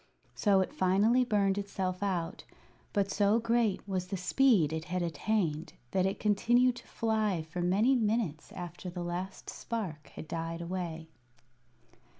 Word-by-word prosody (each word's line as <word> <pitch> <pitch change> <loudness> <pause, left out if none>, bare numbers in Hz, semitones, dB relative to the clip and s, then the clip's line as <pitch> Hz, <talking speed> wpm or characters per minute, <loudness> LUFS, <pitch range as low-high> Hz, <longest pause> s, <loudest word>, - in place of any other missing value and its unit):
So 200 -3 +3
it 185 - -3
finally 205 +7 +3
burned 205 -4 +2
itself 190 -2 -3
out; 185 -5 -2 0.5
but 200 -2 0
so 205 +2 +3
great 230 -4 +1
was 185 -2 -2
the 195 - -3
speed 185 - +3
it 160 0 -3
had 180 0 -2
attained 170 -1 -1 0.2
that 185 0 +2
it 195 - -3
continued 240 +4 +3
to - - -12
fly 215 -6 0
for 165 +3 -5
many 205 +9 +3
minutes 215 - 0
after 175 0 -6
the 175 0 -5
last 180 +3 -5
spark 185 -11 -5
had 155 - -7
died 165 +1 -4
away. 170 -2 -4
190 Hz, 150 wpm, -31 LUFS, 175-215 Hz, 0.5 s, So